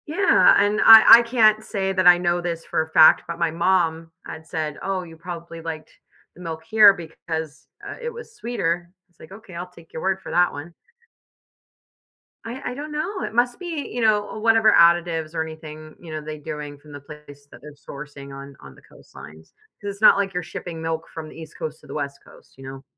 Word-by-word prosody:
Yeah, 380 +6 +4
and 205 +1 +1
I 225 +1 +10
I - - +2
can't 220 -3 +2
say 195 -3 -3
that 185 -1 +2
I 175 0 +8
know 175 0 -1
this 170 -1 -5
for - - -1
a 160 - -6
fact, 160 0 +6
but 170 0 -6
my 170 -2 0
mom 165 -1 0
had 160 - -9
said, 155 -2 -4
"Oh, 190 -1 -3
you 165 -2 -13
probably 170 0 -9
liked 160 -1 -7 0.4
the 180 - -15
milk 160 -2 -7
here 210 +2 +6
because, 160 -3 -7 0.2
uh, - - -7
it 475 - -4
was 470 -1 -12
sweeter." 175 - -3 0.2
It's 175 - -38
like, 160 - -15
"Okay, 195 -2 -13
I'll 175 +1 -7
take 170 -2 -19
your 160 - -6
word 190 0 -1
for - - -9
that 175 0 +2
one." 150 +4 -9 1.7
I 250 +2 -6
I - - -6
don't 295 +4 -8
know, 365 +6 -4
it - - -5
must 240 +1 0
be, 335 -5 -5
you 245 - -4
know, 215 -1 0
whatever 225 0 +4
additives 170 -2 +2
or 160 - -1
anything, 155 -1 -11
you 170 -2 -12
know, 155 0 -5
they 155 0 -8
doing 150 -1 -7
from 150 +1 -17
the 145 - -9
place 145 -1 -15
that - - -15
they're 150 0 -12
sourcing 140 -1 -11
on 140 0 -11
on 70 -1 -14
the - - -19
coastlines, 80 +1 -16 0.3
'cause 205 -1 -4
it's 200 - -18
not 215 - +7
like 195 -1 -2
you're 180 - -2
shipping 165 0 -8
milk 160 0 -4
from 160 -1 -8
the - - -13
East 160 -1 -12
Coast 155 0 -7
to - - -18
the - - -9
West 140 -2 -5
Coast, - - -20
you 135 - -13
know. 135 0 -10
170 Hz, 220 wpm, -22 LUFS, 155-205 Hz, 1.7 s, I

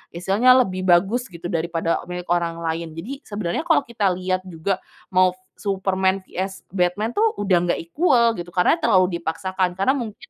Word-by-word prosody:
istilahnya 230 +9 +4
lebih 185 -2 -4
bagus 195 +8 +3
gitu, 175 -1 -7
daripada 165 0 -1
milik 180 0 -5
orang 170 -1 +1
lain. 165 0 -3
Jadi, 235 +12 -6
sebenarnya 205 - -3
kalau - - +4
kita 230 -5 -1
lihat 185 +1 -2
juga 180 +2 -2 0.3
mau 185 -1 +3 0.2
Superman 190 -1 0
vs 190 +1 -5
Batman, 190 +4 0
tuh, 440 - +1
udah 195 -3 +2
nggak - - 0
equal 235 - +3
gitu, 175 - -6
karena 185 - +3
terlalu 185 - +2
dipaksakan 180 +2 -2
karena 195 +7 +2
mungkin 235 -6 -3
185 Hz, 165 wpm, -22 LUFS, 175-210 Hz, 0.3 s, istilahnya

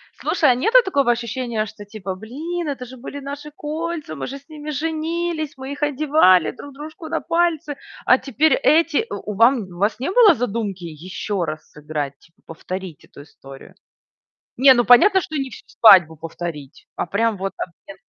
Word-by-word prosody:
Слушай, - - +2
а 245 - +2
нету 450 - +3
такого 280 - +2
ощущения, 235 -1 -2
что 205 -1 -11
типа: 200 -3 -6
"Блин, 305 - -5
это 265 -3 -4
же 260 +2 -12
были 275 +3 -8
наши 285 +2 -8
кольца, 310 - -5
мы 140 - -5
же 275 - -6
с 280 +2 -20
ними 305 -1 -8
женились, 320 +1 -2
мы 265 +1 -7
их 285 - -6
одевали 290 - +4
друг 285 +2 -12
дружку 310 +4 -9
на 325 +1 -2
пальцы, 330 -4 0 0.3
а 255 - +6
теперь 280 +5 +1
эти" 330 +7 +2
у 210 - -5
у - - -6
вам 235 +3 +4
у 180 -2 -12
вас 205 +4 0
не 270 - -2
было 435 -5 +7
задумки 210 -6 -3
ещё 180 +4 -4
раз 155 -1 -7
сыграть, 150 -2 -5
типа, 165 - -26
повторить 180 0 -7
эту - - -14
историю? 135 -2 -14 0.8
Не, 265 +1 +7
ну, 240 - +2
понятно, 380 - +6
что 310 - -6
не 270 -1 -2
всю - - -12
свадьбу 180 -8 +6
повторить, 160 -3 -8
а - - -2
прям 210 +3 0
вот 195 0 -3
обмен 185 +3 -9
255 Hz, 180 wpm, -21 LUFS, 190-305 Hz, 0.8 s, было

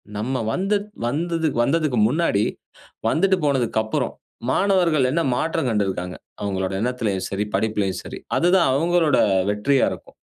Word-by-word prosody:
"நம்ம 125 +5 -2
வந்து 195 +3 +1 0.3
வந்தது 165 +5 -1
வந்ததுக்கு 145 0 +1
முன்னாடி 135 -7 +1 0.6
வந்துட்டு 190 +7 +3
போனதுக்கப்புறம், 120 -5 0 0.4
மாணவர்கள் 170 -5 +3
என்ன 170 +4 +1
மாற்றம் 160 0 -1
கண்டிருக்கிறாங்க, 95 -4 -1 0.3
அவங்களோட 95 -2 -2
எண்ணத்திலேயும் 115 -6 -1
சரி, 100 +2 -2
படிப்பிலேயும் 100 -2 0
சரி," - - -8 0.2
அதுதான் 175 -2 +4
அவங்களோட 165 +1 +2 0.3
வெற்றியா 130 +7 +2
இருக்கும். - - -10
130 Hz, 115 wpm, -22 LUFS, 105-165 Hz, 0.6 s, அதுதான்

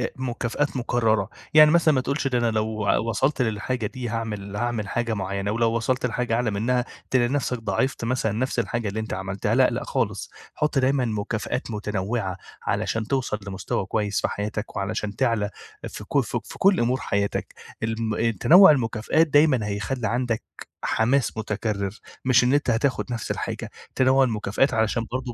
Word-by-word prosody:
مكافآت 130 +2 -2
مكررة. 115 -4 +1 0.2
يعني 155 0 +8
مثلًا 165 -3 +4
ما 130 - +2
تقولش 140 +2 -1
ده 125 -2 +1
أنا 120 -1 +1
لو 110 -1 -1 0.2
وصلت 135 +4 +1
للحاجة 115 +1 -1
دي 125 -1 -5
هاعمل 105 -3 -4
هاعمل 115 -2 -2
حاجة 115 0 -1
معينة، 100 0 -2
ولو 115 +1 +2
وصلت 125 +2 0
لحاجة 125 -1 -1
أعلى 120 -2 0
منها 120 +5 0 0.3
تلاقي 125 -2 +3
نفسك 130 -3 -1
ضاعفت 115 +2 -1
مثلًا 120 -3 0
نفْس 125 +3 -1
الحاجة 115 -1 -2
اللي 105 +2 -3
أنت 110 - -4
عملتها. 95 +1 -2
لا، - - +5
لأ - - -3
خالص. - - -2 0.2
حط 150 -1 0
دايمًا 130 -1 +2
مكافآت 110 +3 -3
متنوعة، 105 -1 -2 0.3
علشان 110 -1 -1
توصل 130 -6 -1
لمستوى 95 0 -3
كويس 105 0 -1
في - - +1
حياتك، 105 +1 -4
وعلشان 105 0 -3
تعلى 115 -5 +1 0.4
ف - - -8
ك - - +1
في - - -5
كل 195 0 +4
أمور 125 +2 +1
حياتك. 100 0 -2 0.3
الم 115 0 0
تنوع 180 +1 +8
المكافآت 125 +4 +2
دايمًا 145 -7 +4
هيخلي 110 +4 -2
عندك 120 -1 -1 0.4
حماس 115 0 +1
متكرر، 105 -2 -3 0.3
مش 125 -1 +5
إن 125 - +3
أنت 145 -3 +2
هتاخد 125 +4 +1
نفْس 115 -2 -3
الحاجة. - - -4 0.2
تنوع 130 +1 +4
المكافآت 115 +2 +1
علشان 110 +1 +1
برضو 130 -1 -3
115 Hz, 165 wpm, -24 LUFS, 105-130 Hz, 0.4 s, يعني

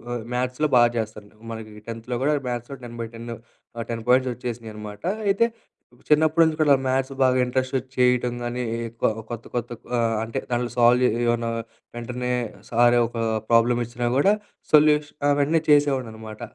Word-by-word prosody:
ఆహ్, 120 - -5
మ్యాథ్స్‌లో 125 +4 0
బాగా 120 0 +5
చేస్తాను. 105 -2 -6 0.2
మనకి 110 -1 -8
10త్ 115 +2 -4
గూడా 150 +2 +3
మ్యాథ్స్‌లో 120 +3 -5
10/10 115 0 -7 0.4
ఆహ్ 115 - -4
10 115 -1 -4
పాయింట్స్ 130 0 +4
వచ్చేసినాయన్నమాట. 110 -4 -7 0.3
అయితే, 200 +4 +4 0.6
చిన్నప్పటి 155 +2 +4
నుంచి 160 -1 0
కూడా 145 -2 +5
మ్యాథ్స్ 130 +1 0
బాగా 130 -1 +4
ఇంటరెస్ట్‌ 130 +1 -1
ఒచ్చి 130 0 -6
చేయటం 125 -1 +3
గాని 120 +1 -3 0.3
ఎక్కువ 115 0 0 0.2
కొత్త 120 -1 -6
కొత్త 120 -1 -2 0.3
ఆహ్, 115 -1 +1
అంటే 115 0 -3
దాంట్లో 120 0 -1
సాల్వ్ 120 +1 +5
జే 125 - +5 0.2
ఎమన్న 120 0 +1 0.5
వెంటనే 125 +1 -3 0.4
సర్ 120 +1 +4
ఒక 120 - -8 0.3
ప్రాబ్లమ్ 120 +1 +4
ఇచ్చినా 120 +1 -3
గూడా 170 +10 +4 0.4
సొల్యూష 150 0 +5 0.2
ఆ! - - +4
వెంటనే 155 +3 +2
చేసేవాడినన్నమాట. 125 -7 +1
120 Hz, 150 wpm, -24 LUFS, 115-130 Hz, 0.6 s, బాగా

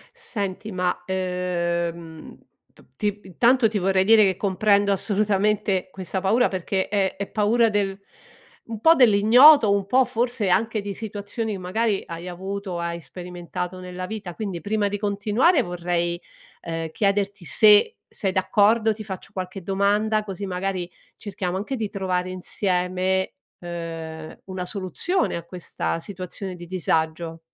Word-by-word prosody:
Senti 215 - -4
ma, 180 -1 -1
ehm, 170 -3 -3 0.3
p - - -21 0.2
ti 205 0 -1
intanto 235 +6 +3
ti 210 -1 -2
vorrei 190 0 +2
dire 220 +1 +6
che 190 -2 +2
comprendo 200 +1 +2
assolutamente 205 -1 +1
questa 190 0 -4
paura 225 +6 +3
perché 190 +1 -2
è 195 -2 0
è 200 +1 -4
paura 225 +2 +2
del 200 -1 -1 0.7
un 225 -2 -6
po' 320 +9 +7
dell'ignoto, 235 +3 +7
un 200 -1 -2
po' 255 +3 +4
forse 240 -3 -1
anche 220 +4 +1
di 200 0 -5
situazioni, 210 +1 -4
magari 195 +3 -1
hai 170 +1 -7
avuto, 190 +1 -5
hai 170 0 -3
sperimentato 180 +1 -6
nella 180 0 -6
vita 195 -4 -6
quindi 195 -6 -4
prima 205 0 0
di 205 0 -3
continuare 215 - +2
vorrei, 175 -1 -2 0.4
ehm, 165 -1 -4
chiederti 200 0 0
se 210 - +5
sei 195 -3 -1
d'accordo, 215 +3 +3
ti 215 +1 -8
faccio 190 -3 -8
qualche 185 0 -6
domanda, 205 +3 +1
così 200 -1 -6
magari 185 -1 -3 0.3
cerchiamo 190 -3 -4
anche 215 +7 -3
di 220 -4 -3
trovare 185 -2 -2
insieme, 185 0 -1 0.3
ehm, 165 -2 -7
una 185 -1 -5
soluzione 200 - -1
a 170 - -7
questa 170 -1 -4
situazione 185 +1 -6
di 175 0 -10
disagio. 165 -2 -1
195 Hz, 140 wpm, -23 LUFS, 180-210 Hz, 0.7 s, po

